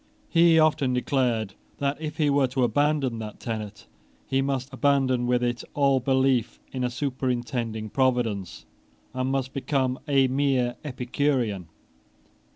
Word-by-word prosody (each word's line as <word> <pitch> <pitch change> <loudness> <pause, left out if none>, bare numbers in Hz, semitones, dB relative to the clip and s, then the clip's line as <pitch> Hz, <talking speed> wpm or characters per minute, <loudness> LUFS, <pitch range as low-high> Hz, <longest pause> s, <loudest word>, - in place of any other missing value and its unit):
He 165 -1 +5
often 150 -5 +3
declared 125 -5 0 0.2
that, 140 +2 -2
if 155 -1 -5
he 150 -2 +2
were 140 -1 +3
to 130 0 -1
abandon 145 -2 +1
that 105 -1 -7
tenet, 110 -3 -6 0.4
he 135 0 +1
must 135 -1 -2
abandon 130 -3 +2
with 125 0 +2
it 120 0 -1
all 140 -2 +3
belief 130 -2 +1
in 130 -1 -3
a 125 - +1
superintending 120 -4 -3
Providence, 120 - 0 0.5
and 130 +1 -1
must 135 -1 -2
become 135 -2 -1
a 135 -2 +4
mere 130 -2 +1
Epicurean. 125 - -1
130 Hz, 135 wpm, -26 LUFS, 120-140 Hz, 0.5 s, He